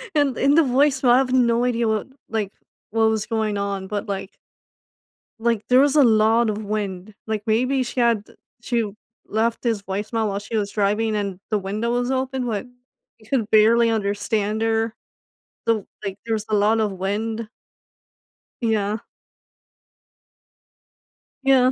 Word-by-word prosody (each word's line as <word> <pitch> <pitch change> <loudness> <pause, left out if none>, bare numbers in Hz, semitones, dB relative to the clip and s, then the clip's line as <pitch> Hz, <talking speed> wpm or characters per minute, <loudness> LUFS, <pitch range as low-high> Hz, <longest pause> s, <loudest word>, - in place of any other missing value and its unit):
and, 285 -4 +2
in 280 +2 +3
the 330 - +6
voice 270 +1 +2
mail, 245 -2 +4
I - - +6
have 260 -1 0
no 240 -1 +3
idea 235 -2 +1
what 220 +1 0 0.2
like, 210 -3 -2 0.4
what 225 +1 +2
was 220 -1 0
going 220 -3 -1
on 200 -1 -3
but, 205 0 -4
like 195 -1 -4 1.1
like, 230 -2 0
there 250 +1 +5
was 285 0 +3
a 290 - +7
lot 225 0 +4
of 215 +1 -3
wind, 205 -1 -4
like, 215 -1 -2
maybe 255 +4 +2
she 250 +1 -4
had 230 -3 +3 0.4
she 230 -3 -1 0.3
left 225 +2 0
this 225 -4 0
voicemail 210 +3 -2
while 200 0 -2
she 205 +3 -6
was 205 -1 -1
driving 210 +2 +1
and 200 -3 -3
the 215 - +2
window 210 +5 -2
was 245 +1 0
open, 260 -1 -1
like, 220 +2 -3 0.5
you 215 - -20
could 230 -6 0
barely 230 +2 +5
understand 215 0 -1
her, 225 0 0 0.7
so, 220 -3 +1 0.2
like, 195 -1 -4
there 225 - -1
was 215 -1 -2
a 215 - +2
lot 215 +2 +3
of 210 -2 0
wind. 215 +4 -3 1.1
Yeah. 215 -2 0 2.5
Yeah. 260 -1 +5
220 Hz, 160 wpm, -22 LUFS, 205-235 Hz, 2.5 s, a